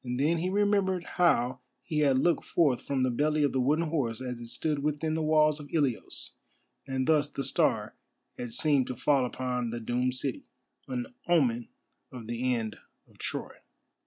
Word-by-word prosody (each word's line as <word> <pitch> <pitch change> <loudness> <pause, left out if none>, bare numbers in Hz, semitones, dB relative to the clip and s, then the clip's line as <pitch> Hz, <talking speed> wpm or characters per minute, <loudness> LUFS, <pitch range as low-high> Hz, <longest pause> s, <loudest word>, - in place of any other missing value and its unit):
Then 140 +7 +1
he 180 +3 -1
remembered 200 -2 +2
how 130 -9 +2 0.2
he 155 -3 -2
had 140 -3 +4
looked 170 +6 +2
forth 145 -8 +2
from 135 -2 -1
the 130 - +2
belly 150 +4 +1
of 145 - +2
the 130 - 0
wooden 155 +6 +2
horse 125 -8 -1
as 125 -2 -5
it 120 - -7
stood 150 +5 -1
within 150 +2 -1
the 160 - -1
walls 155 -1 +3
of 145 -1 -10
Ilios, 140 -8 -2 0.5
and 130 -1 -1
thus 150 -1 +3
the 140 - -4
star - - +1 0.4
had 120 -1 -6
seemed 140 -1 +3
to 125 - -4
fall 130 +1 +2
upon 125 -1 -2
the 120 +1 -4
doomed 125 +2 -1
city, 130 0 -4 0.4
an 125 -2 -4
omen 125 -9 +2 0.4
of 125 -3 -8
the 120 +3 -1
end 110 -2 -4 0.3
of - - -24
Troy. - - -5
135 Hz, 180 wpm, -29 LUFS, 125-155 Hz, 0.5 s, had